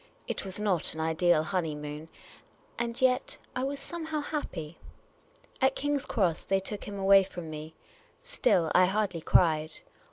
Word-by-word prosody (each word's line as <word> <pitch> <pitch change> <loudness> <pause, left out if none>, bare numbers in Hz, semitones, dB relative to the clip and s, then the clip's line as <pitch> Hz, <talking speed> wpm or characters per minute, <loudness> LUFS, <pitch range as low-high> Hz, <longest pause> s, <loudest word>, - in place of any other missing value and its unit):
It - - -3
was 195 +1 -4
not 190 -7 0
an - - -6
ideal 160 0 +3
honeymoon, 155 -3 -3 0.7
and 235 +1 -2
yet, 260 0 +2 0.2
I 255 - -1
was 280 +1 -2
somehow 315 -1 -4
happy. 170 - -5 0.8
At 265 0 +3
King's 290 -1 -1
Cross, 180 -8 0
they 195 - +2
took 200 +2 -5
him 200 -1 -6
away 195 0 +6
from 175 -4 -8
me. 155 +1 -8 0.5
Still, 180 - +2
I 185 - +6
hardly 195 -4 -1
cried. 155 -2 +3
190 Hz, 150 wpm, -29 LUFS, 160-250 Hz, 0.8 s, away